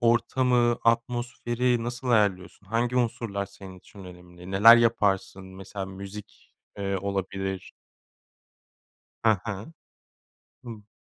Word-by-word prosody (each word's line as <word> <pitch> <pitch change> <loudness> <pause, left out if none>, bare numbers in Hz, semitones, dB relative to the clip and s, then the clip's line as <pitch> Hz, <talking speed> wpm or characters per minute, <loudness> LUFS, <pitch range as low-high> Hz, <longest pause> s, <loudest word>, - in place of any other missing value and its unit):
ortamı 120 0 +2
atmosferi 120 +1 0
nasıl 120 +2 -5
ayarlıyorsun? 100 -4 +1
Hangi 120 +4 -1
unsurlar 115 -5 -1
senin 95 -2 -12
için 100 +1 -14
önemli? 90 0 -12
Neler 110 +5 +8
yaparsın 100 -4 +1
mesela 95 +1 -7
müzik, 100 +2 -11 0.3
eee, 100 -1 -1
olabilir? 95 -1 -4 1.5
He 115 - +6
he. 105 - -3 0.9
Hımm. 110 -4 -10
105 Hz, 100 wpm, -26 LUFS, 95-120 Hz, 1.5 s, Neler